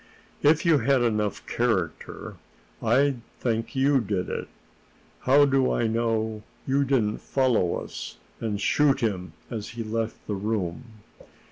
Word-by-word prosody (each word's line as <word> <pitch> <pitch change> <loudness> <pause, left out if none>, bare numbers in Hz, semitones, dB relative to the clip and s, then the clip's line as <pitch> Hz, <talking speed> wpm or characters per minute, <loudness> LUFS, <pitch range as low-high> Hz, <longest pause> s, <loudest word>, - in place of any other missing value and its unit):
"If 155 +4 +4
you 165 -4 +5
had 130 +1 +3
enough 105 -3 0
character, 95 -10 -2 0.4
I'd 135 -2 +2 0.2
think 115 0 -1
you 135 +1 +4
did 95 -4 -2
it. - - -4 0.7
How 140 +3 +5
do 135 -2 +2
I 120 - +1
know 110 -1 0 0.2
you 140 +1 +2
didn't 120 -6 +1
follow 125 -10 +1
us, - - -6 0.2
and 105 -3 -2
shoot 140 +5 +3
him 90 -7 -2 0.2
as 110 -3 -4
he 115 - -2
left 115 0 -2
the 105 - -3
room?" 100 0 -2
115 Hz, 135 wpm, -26 LUFS, 105-135 Hz, 0.7 s, you